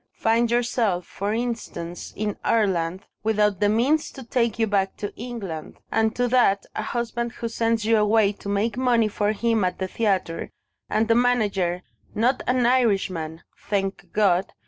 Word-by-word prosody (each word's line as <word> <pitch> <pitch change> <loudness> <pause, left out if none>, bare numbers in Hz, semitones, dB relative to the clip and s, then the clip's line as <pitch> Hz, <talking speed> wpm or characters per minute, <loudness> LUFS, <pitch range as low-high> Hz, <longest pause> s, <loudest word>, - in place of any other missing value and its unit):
Find 230 +1 +2
yourself, 235 -6 +1
for 200 +1 -3
instance, 220 -7 -4
in 210 -1 -2
Ireland, 185 -4 +1 0.2
without 210 -3 +1
the 205 - +3
means 265 +9 +2
to 265 - -9
take 235 -2 0
you 225 - +2
back 195 -2 0
to 205 - -5
England. 210 -10 -6
Add 220 0 +1
to 245 0 +1
that, 235 -5 +3
a - - -1
husband 235 +1 -3
who 235 - -4
sends 230 -1 0
you 225 0 +4
away 210 -1 +4
to 205 0 -9
make 205 +3 0
money 240 -4 +3
for 205 0 0
him 225 0 +1
at 180 -1 0
the 190 - -2
theatre, 190 -5 -1 0.4
and 220 +1 +1
a - - +7
manager 205 -7 +1 0.3
(not 245 +4 +2
an 250 -1 +2
Irishman, 195 -10 +1 0.3
thank 195 -1 -2
God!) 195 -3 +2
215 Hz, 165 wpm, -24 LUFS, 195-235 Hz, 0.4 s, a